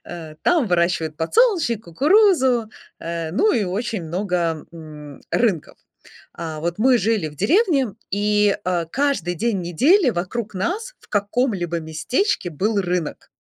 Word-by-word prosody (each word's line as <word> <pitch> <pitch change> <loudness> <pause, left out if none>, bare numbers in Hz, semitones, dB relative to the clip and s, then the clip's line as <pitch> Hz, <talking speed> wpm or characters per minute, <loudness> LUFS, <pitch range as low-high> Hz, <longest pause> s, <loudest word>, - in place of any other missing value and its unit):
А, 160 -3 -8
там 335 -8 +3
выращивают 170 -4 0
подсолнечник, 290 - +2
кукурузу, 265 - +3 0.3
э, 165 -1 -4
ну 420 - +2
и 215 - +1
очень 205 +2 -3
много, 170 -2 -2
м, 150 -3 -11
рынков. 200 -10 0 0.6
А, 160 -2 -6
вот 170 +4 -3
мы 250 +1 +4
жили 205 -5 0
в 150 - -14
деревне, 290 - +2 0.2
и, 210 0 +2
а, 175 -2 0
каждый 225 - -1
день 215 +1 -1
недели 265 - +3
вокруг 205 +3 -4
нас 415 - -3
в - - -22
каком-либо 205 -5 -1
местечке 175 - -1
был 200 +6 0
рынок. 180 -4 -3
200 Hz, 135 wpm, -21 LUFS, 170-250 Hz, 0.6 s, мы